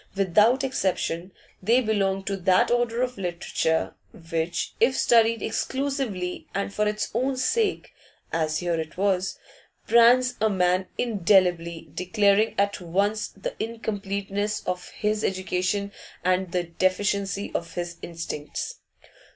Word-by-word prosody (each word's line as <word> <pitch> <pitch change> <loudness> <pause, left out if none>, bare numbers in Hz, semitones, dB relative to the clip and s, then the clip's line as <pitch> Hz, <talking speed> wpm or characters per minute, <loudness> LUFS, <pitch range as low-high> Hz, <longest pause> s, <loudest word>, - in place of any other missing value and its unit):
Without 210 +7 +4
exception 185 -7 -1 0.3
they 230 +6 +4
belonged 195 -4 0
to 200 - -1
that 185 +2 +3
order 240 0 +1
of 250 -4 -3
literature 170 -3 -1 0.4
which, 165 +1 -1
if 255 +3 +3
studied 230 -1 +4
exclusively 265 -10 -2
and 200 0 -2
for 210 0 +1
its 210 0 -2
own 260 +4 0
sake, 410 - 0 0.4
as 155 -1 0
here 175 -1 -1
it 160 +1 -6
was, 195 -1 0 0.5
brands 245 +1 +5
a 220 - +4
man 185 -1 +1
indelibly, 175 -7 +2
declaring 200 +4 +2
at 200 -1 +1
once 200 +5 0
the - - -6
incompleteness 205 -2 -3
of 180 0 -3
his 210 0 -1
education 190 +1 -1 0.3
and 185 0 +1
the 180 0 0
deficiency 195 +3 0
of 170 -1 -4
his 175 -1 -4
instincts. 165 -3 -5
200 Hz, 125 wpm, -25 LUFS, 180-225 Hz, 0.5 s, brands